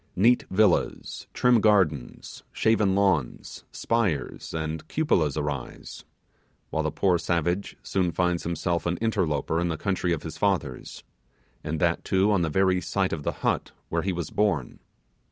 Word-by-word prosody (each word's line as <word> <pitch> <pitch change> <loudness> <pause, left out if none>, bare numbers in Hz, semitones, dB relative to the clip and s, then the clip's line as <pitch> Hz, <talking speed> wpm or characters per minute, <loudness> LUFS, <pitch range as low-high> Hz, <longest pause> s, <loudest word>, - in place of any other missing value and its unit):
Neat 120 +6 +4
villas, 100 -1 +1
trim 125 -3 +3
gardens, 95 - +1
shaven 105 -4 +2
lawns, 95 -11 0
spires, 100 - -1
and 80 0 -4
cupolas 80 - +1
arise, 75 -4 -5 0.7
while - - 0
the - - 0
poor 90 -3 +1
savage 85 +3 -1
soon 90 -3 0
finds 90 -1 0
himself 85 0 -2
an 85 +1 0
interloper 85 -8 0
in 85 - 0
the 80 -2 -2
country 95 -2 -1
of 80 -3 -1
his 80 - -7
fathers, 100 -3 -2 0.6
and 80 0 -3
that 85 0 +1
too 95 +2 +2
on 100 -3 +2
the 85 - 0
very 95 +3 +2
site 95 0 -1
of 80 - -3
the - - -1
hut - - 0 0.2
where - - 0
he 95 - -1
was 85 -2 -4
born. 100 -12 0
90 Hz, 155 wpm, -26 LUFS, 80-100 Hz, 0.7 s, Neat